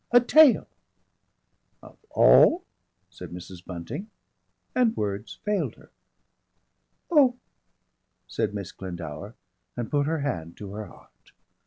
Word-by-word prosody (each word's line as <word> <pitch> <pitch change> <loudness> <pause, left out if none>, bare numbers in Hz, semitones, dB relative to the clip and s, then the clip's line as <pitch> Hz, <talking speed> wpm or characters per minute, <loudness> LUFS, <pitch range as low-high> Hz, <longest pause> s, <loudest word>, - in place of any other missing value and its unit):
"A 245 - +7
tail!" 275 +2 +6 1.2
"Of - - -14
all 355 +3 +6 0.2
" 90 +1 -48
said 90 -2 -10
Mrs. 90 0 -10
Bunting, 90 - -7 0.6
and 245 -3 +2
words 105 +1 -3
failed 210 -1 -1
her. - - -20 1.2
"Oh!" 270 -6 +5 0.9
said 105 - -2
Miss 100 -3 -5
Glendower, 90 +2 -8 0.4
and 120 -2 -4
put 145 -1 +1
her 160 -1 -1
hand 85 - -4
to 100 -2 -8
her 105 0 -6
heart. - - -20
105 Hz, 120 wpm, -26 LUFS, -, 1.2 s, A